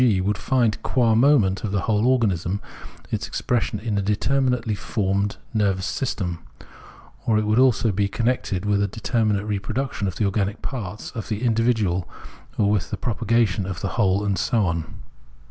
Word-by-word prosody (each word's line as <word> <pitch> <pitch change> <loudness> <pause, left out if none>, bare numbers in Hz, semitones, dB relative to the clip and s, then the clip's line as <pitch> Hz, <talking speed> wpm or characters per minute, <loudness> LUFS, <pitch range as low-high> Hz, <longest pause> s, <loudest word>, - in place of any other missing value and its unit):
g., 115 -7 +4
would 100 +3 0
find, 120 -3 +1
qua 120 -4 +2
moment 115 -6 +4
of 105 - -2
the 100 -1 0
whole 110 +3 +1
organism, 100 -7 +1 0.5
its - - -2
expression 120 -3 -1
in 105 -1 -1
a - - +1
determinately 120 +3 +1
formed 100 0 -1 0.2
nervous 100 -4 +1
system, 95 -7 -2 0.9
or 110 - +4
it 110 - +1
would 110 +3 +2
also 120 -4 +4
be 100 +1 +1
connected 115 -4 -1
with 100 -1 +2
a 100 - +2
determinate 105 -1 0
reproduction 105 +2 -2
of 95 - -3
the 105 - 0
organic 100 +1 -1
parts 105 -6 -5
of 115 -4 -6
the 110 +1 -3
individual 110 -6 +1 0.5
or 105 -1 +3
with 105 -4 0
the - - -3
propagation 110 -3 0
of 95 -2 -5
the 100 - -1
whole, 100 -2 +1
and 100 -2 0
so 115 -5 +1
on. 85 -2 -1
105 Hz, 170 wpm, -23 LUFS, 100-115 Hz, 0.9 s, g